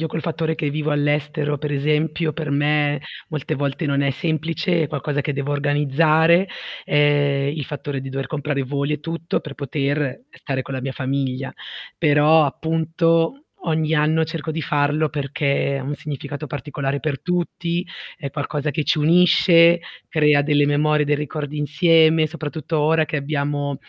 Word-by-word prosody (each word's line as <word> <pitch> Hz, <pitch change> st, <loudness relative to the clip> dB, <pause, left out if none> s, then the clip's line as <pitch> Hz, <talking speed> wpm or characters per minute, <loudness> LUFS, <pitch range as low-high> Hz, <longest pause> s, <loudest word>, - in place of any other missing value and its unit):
Io 160 Hz, -, -1 dB
col 160 Hz, 0 st, -4 dB
fattore 160 Hz, -1 st, -1 dB
che 155 Hz, -2 st, -2 dB
vivo 155 Hz, +1 st, -2 dB
all'estero 145 Hz, 0 st, 0 dB
per 150 Hz, +1 st, -4 dB
esempio 155 Hz, +3 st, 0 dB
per 155 Hz, -1 st, -4 dB
me 145 Hz, 0 st, +1 dB, 0.3 s
molte 155 Hz, -4 st, -3 dB
volte 140 Hz, +3 st, -2 dB
non 140 Hz, 0 st, +1 dB
è 140 Hz, -1 st, +2 dB
semplice, 165 Hz, +3 st, -1 dB
è -, -, -2 dB
qualcosa 145 Hz, 0 st, -2 dB
che 145 Hz, -, -2 dB
devo 140 Hz, +1 st, -3 dB
organizzare, 155 Hz, +5 st, +3 dB, 0.4 s
ehm, 145 Hz, -1 st, +2 dB
il 150 Hz, -, -3 dB
fattore 145 Hz, 0 st, -5 dB
di 135 Hz, -, -7 dB
dover 135 Hz, 0 st, -4 dB
comprare 145 Hz, -3 st, -2 dB
voli 140 Hz, +2 st, -2 dB
e 150 Hz, -, -7 dB
tutto 165 Hz, +2 st, -3 dB
per 150 Hz, -, -9 dB
poter 140 Hz, -, -2 dB
stare 135 Hz, -, -4 dB
con 135 Hz, -, -7 dB
la 130 Hz, -, -3 dB
mia 135 Hz, +1 st, -4 dB
famiglia, 130 Hz, 0 st, -2 dB, 0.4 s
però 155 Hz, 0 st, +5 dB
appunto, 165 Hz, -, 0 dB, 0.2 s
ogni 160 Hz, -2 st, 0 dB
anno 155 Hz, +1 st, +2 dB
cerco 160 Hz, 0 st, -5 dB
di 160 Hz, -, -3 dB
farlo 145 Hz, +2 st, +1 dB
perché 140 Hz, -1 st, -1 dB
ha -, -, -5 dB
un 140 Hz, +3 st, -3 dB
significato 145 Hz, +1 st, -6 dB
particolare 140 Hz, 0 st, -3 dB
per 145 Hz, -4 st, -2 dB
tutti, 175 Hz, 0 st, -2 dB, 0.3 s
è 140 Hz, -4 st, -6 dB
qualcosa 145 Hz, +1 st, -3 dB
che 150 Hz, +2 st, -2 dB
ci -, -, +1 dB
unisce, 170 Hz, +1 st, +5 dB, 0.3 s
crea 150 Hz, -2 st, +3 dB
delle 145 Hz, 0 st, +3 dB
memorie, 150 Hz, +1 st, +2 dB
dei 145 Hz, 0 st, +1 dB
ricordi 150 Hz, 0 st, -4 dB
insieme, 160 Hz, +1 st, +4 dB
soprattutto 155 Hz, 0 st, -4 dB
ora 155 Hz, +1 st, +3 dB
che 155 Hz, +1 st, -3 dB
abbiamo 145 Hz, -1 st, -2 dB
150 Hz, 165 wpm, -21 LUFS, 140-160 Hz, 0.4 s, però